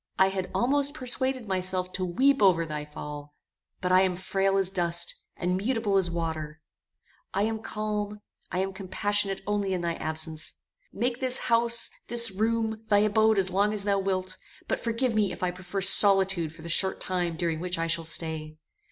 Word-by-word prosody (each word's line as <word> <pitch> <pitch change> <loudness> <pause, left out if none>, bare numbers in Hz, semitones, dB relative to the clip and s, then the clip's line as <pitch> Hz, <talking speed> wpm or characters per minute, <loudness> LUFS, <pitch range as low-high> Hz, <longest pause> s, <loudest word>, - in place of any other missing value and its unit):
I 190 0 +4
had 190 -1 -4
almost 285 +3 +1
persuaded 255 -2 -1
myself 185 -1 -2
to 185 - -2
weep 265 +10 +2
over 180 -4 +4
thy 150 -1 -5
fall; 150 -1 -9 0.5
but 180 -1 -1
I 185 0 +6
am 185 -1 +1
frail 195 +1 0
as 190 -1 0
dust, 170 -2 -1 0.2
and 180 +1 -1
mutable 215 0 -1
as 185 -2 +1
water; 160 -2 -4 0.8
I 200 - +1
am 220 +1 -2
calm, 210 -1 -4 0.3
I 180 - -1
am 195 0 -5
compassionate 195 +1 -2
only 205 -2 -1
in 180 - -3
thy 170 -1 -1
absence. 155 0 -4 0.4
Make 245 0 -2
this 255 -1 0 0.2
house, 235 0 +3 0.2
this 235 -2 0
room, 220 +2 -1
thy 205 -2 +3
abode 215 +1 +3
as 190 -1 +1
long 200 +3 +1
as 205 - +2
thou 200 -1 +1
wilt, 185 -1 -3 0.3
but - - -1
forgive 235 +1 -1
me 210 -3 +1
if 180 - -7
I 180 - +1
prefer 185 +2 -5
solitude 190 -4 +8
for 160 - -13
the - - -7
short 190 +3 0
time 175 -3 -2
during 165 -2 -2
which 180 +1 -3
I 165 - -1
shall 165 0 0
stay." 160 -1 -3
190 Hz, 185 wpm, -27 LUFS, 175-215 Hz, 0.8 s, solitude